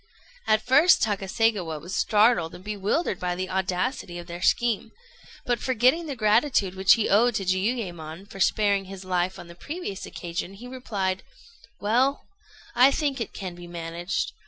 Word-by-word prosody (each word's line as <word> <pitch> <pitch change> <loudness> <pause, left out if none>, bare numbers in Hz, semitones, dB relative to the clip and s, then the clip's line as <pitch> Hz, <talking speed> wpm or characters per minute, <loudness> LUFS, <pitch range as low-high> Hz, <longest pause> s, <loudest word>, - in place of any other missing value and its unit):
At 215 0 +2
first 295 +8 +5
Takaségawa 200 -4 0
was 175 +5 -8
startled 210 -6 +3
and 180 - -12
bewildered 205 - -1
by 180 -1 -2
the 185 +1 -4
audacity 185 +1 -2
of 175 - -7
their 175 +1 -8
scheme; 230 +2 +1 0.5
but 245 -1 0
forgetting 260 +7 +2
the 280 - -4
gratitude 215 -2 +2
which 190 0 +5
he 225 - +1
owed 230 +4 +4
to 195 - -1
Jiuyémon 185 -3 -2
for 195 - -11
sparing 200 0 +2
his 190 0 -9
life 180 0 -1
on - - -9
the 170 - -11
previous 290 - -6
occasion, 175 +2 -5
he 240 +5 -10
replied: 200 -7 -3 0.6
"Well, 250 +7 +1 0.5
I 255 +2 +6
think 275 -2 -1
it 225 - -3
can 185 -2 -6
be 175 0 -11
managed. 170 +1 -3
195 Hz, 160 wpm, -25 LUFS, 180-240 Hz, 0.6 s, I